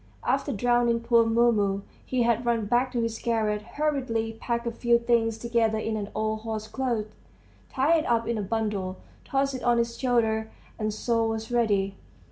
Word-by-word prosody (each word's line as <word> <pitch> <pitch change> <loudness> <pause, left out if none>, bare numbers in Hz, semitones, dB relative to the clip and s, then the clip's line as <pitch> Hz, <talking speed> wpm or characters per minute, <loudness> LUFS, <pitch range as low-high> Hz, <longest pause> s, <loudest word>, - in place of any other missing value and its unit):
After 275 +3 +1
drowning 240 +1 +2
poor 235 -1 +4
Mumu, 220 -4 +2 0.2
he 255 -2 0
had 235 0 +2
run 235 -3 +1
back 245 +4 +1
to 240 -2 0
his 225 -1 -3
garret, 215 -3 0
hurriedly 235 -4 -2
packed 235 -1 -2
a 235 - -1
few 235 +1 +3
things 235 -1 +1
together 230 -1 +1
in 220 0 -2
an 205 -1 -4
old 215 0 -1
horsecloth, 220 0 -3 0.6
tied 300 +5 +3
it 310 - -3
up 230 -1 +1
in 235 -2 -1
a - - 0
bundle, 200 -3 -2 0.3
tossed 275 0 0
it 255 - -5
on 240 -1 +3
his 235 0 0
shoulder, 225 -3 +1 0.3
and 215 0 0
so 230 +1 0
was 225 +1 -4
ready. 200 -5 +1
230 Hz, 175 wpm, -27 LUFS, 220-240 Hz, 0.6 s, poor